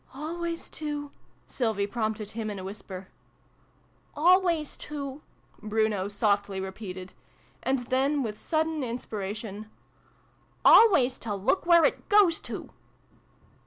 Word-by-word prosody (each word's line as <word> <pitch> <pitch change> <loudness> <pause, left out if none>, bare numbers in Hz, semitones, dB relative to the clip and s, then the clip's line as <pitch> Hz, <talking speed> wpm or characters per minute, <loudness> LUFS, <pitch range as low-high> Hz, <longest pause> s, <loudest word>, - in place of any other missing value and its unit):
"Always 335 +3 -4
to 295 -2 -5 0.3
Sylvie 220 -5 -1
prompted 215 -1 -3
him 220 -1 -4
in 205 - -5
a 190 - -6
whisper. 190 -1 -8 0.5
" - - -36 0.3
Always 340 -1 +3
to 285 -1 -6 0.2
' - - -35
Bruno 215 -2 0
softly 200 -1 0
repeated: 190 -1 -7 0.5
and 265 +1 +1
then, 270 +3 +1
with 210 -2 -5
sudden 315 -1 0
inspiration, 215 -3 -5 0.5
" - - -36
always 270 - +7
to 215 -2 -3
look 255 - 0
where 340 -1 +7
it - - -1
goes 405 -6 +5
to - - -6
230 Hz, 125 wpm, -28 LUFS, 205-300 Hz, 0.5 s, always